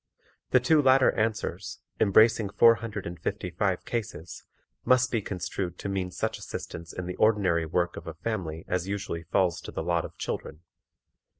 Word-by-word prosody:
The 130 Hz, -, +5 dB
two 150 Hz, +5 st, +4 dB
latter 130 Hz, -1 st, +5 dB
answers, 105 Hz, -3 st, -2 dB, 0.2 s
embracing 110 Hz, 0 st, +5 dB
four 115 Hz, +3 st, +6 dB
hundred 110 Hz, -4 st, -5 dB
and 85 Hz, -1 st, -6 dB
fifty -, -, -3 dB
five -, -, -1 dB
cases, 110 Hz, -7 st, -5 dB, 0.4 s
must 130 Hz, 0 st, +3 dB
be 115 Hz, -, +1 dB
construed 90 Hz, -1 st, -4 dB
to 100 Hz, -, -5 dB
mean 95 Hz, -2 st, -2 dB
such -, -, -3 dB
assistance 85 Hz, +1 st, -7 dB
in 90 Hz, -, -5 dB
the 90 Hz, -, -4 dB
ordinary 95 Hz, -7 st, +3 dB
work 85 Hz, +2 st, 0 dB
of -, -, -8 dB
a 80 Hz, -, -6 dB
family 85 Hz, -4 st, -4 dB
as 90 Hz, 0 st, -1 dB
usually 100 Hz, -4 st, -3 dB
falls 85 Hz, +1 st, +1 dB
to -, -, -8 dB
the -, -, -4 dB
lot 85 Hz, -1 st, +1 dB
of -, -, -9 dB
children. 75 Hz, +1 st, -5 dB
95 Hz, 175 wpm, -28 LUFS, 85-110 Hz, 0.4 s, four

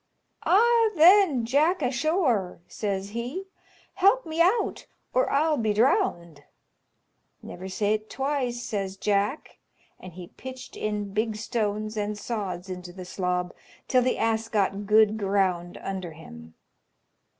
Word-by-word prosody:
"Ah, 460 Hz, +3 st, +5 dB
then, 335 Hz, -, +6 dB
Jack 305 Hz, +9 st, +2 dB
asthore," 250 Hz, -, 0 dB
says 200 Hz, -2 st, -3 dB
he, 245 Hz, -, -5 dB, 0.5 s
"help 400 Hz, +7 st, +3 dB
me 320 Hz, +1 st, -1 dB
out 380 Hz, +7 st, +1 dB, 0.3 s
or -, -, +2 dB
I'll 305 Hz, +2 st, +2 dB
be 220 Hz, -2 st, +1 dB
drowned." 205 Hz, -, +1 dB, 1.0 s
"Never 185 Hz, +2 st, -8 dB
say't 215 Hz, +2 st, -1 dB
twice," 260 Hz, -2 st, -2 dB
says 195 Hz, -2 st, -4 dB
Jack, 205 Hz, +7 st, -1 dB, 0.4 s
and 185 Hz, -2 st, -11 dB
he 175 Hz, 0 st, -10 dB
pitched 260 Hz, 0 st, -10 dB
in 210 Hz, -2 st, -3 dB
big 215 Hz, +1 st, 0 dB
stones 215 Hz, -1 st, -2 dB
and 210 Hz, 0 st, -2 dB
sods 195 Hz, -5 st, -4 dB
into 180 Hz, -1 st, -7 dB
the 185 Hz, 0 st, -9 dB
slob, 180 Hz, -1 st, -2 dB, 0.3 s
till 255 Hz, -, +3 dB
the 250 Hz, +1 st, 0 dB
ass 225 Hz, 0 st, 0 dB
got 200 Hz, -1 st, 0 dB
good 215 Hz, 0 st, +4 dB
ground 190 Hz, -3 st, 0 dB
under 185 Hz, -4 st, -5 dB
him. 80 Hz, -, -13 dB
215 Hz, 130 wpm, -26 LUFS, 190-270 Hz, 1.0 s, then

